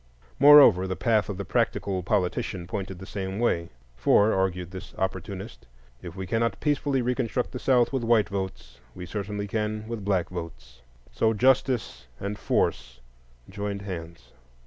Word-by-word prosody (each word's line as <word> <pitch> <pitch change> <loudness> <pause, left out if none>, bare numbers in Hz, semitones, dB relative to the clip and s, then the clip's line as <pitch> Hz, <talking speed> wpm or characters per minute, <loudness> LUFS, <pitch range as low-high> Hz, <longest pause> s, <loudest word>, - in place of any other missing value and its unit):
Moreover, 140 -10 +8
the 95 - -2
path 110 -2 +1
of 100 - -4
the 100 - -5
practical 95 +2 0
politician 90 -2 -1
pointed 95 +1 -5
the 95 - -9
same 95 -1 -5
way; 85 -8 0 0.3
for, 100 - +4
argued 90 -2 -1
this 95 +1 -9
opportunist, 95 -8 -5 0.3
if 85 0 -9
we 95 -1 -5
cannot 115 +1 -1
peacefully 145 -3 0
reconstruct 125 0 -1
the 125 - -6
South 125 -1 +2
with 130 -3 -1
white 115 -2 +3
votes, 80 -12 -5 0.2
we 90 - -7
certainly 105 +1 -4
can 110 +1 -3
with 115 -3 -5
black 95 -3 0
votes. 65 -9 -8 0.3
So 110 0 +1
justice 125 - +1
and 100 +1 -4
force - - -1 0.5
joined 100 0 -5
hands. 85 -9 -8
100 Hz, 150 wpm, -26 LUFS, 90-115 Hz, 0.5 s, Moreover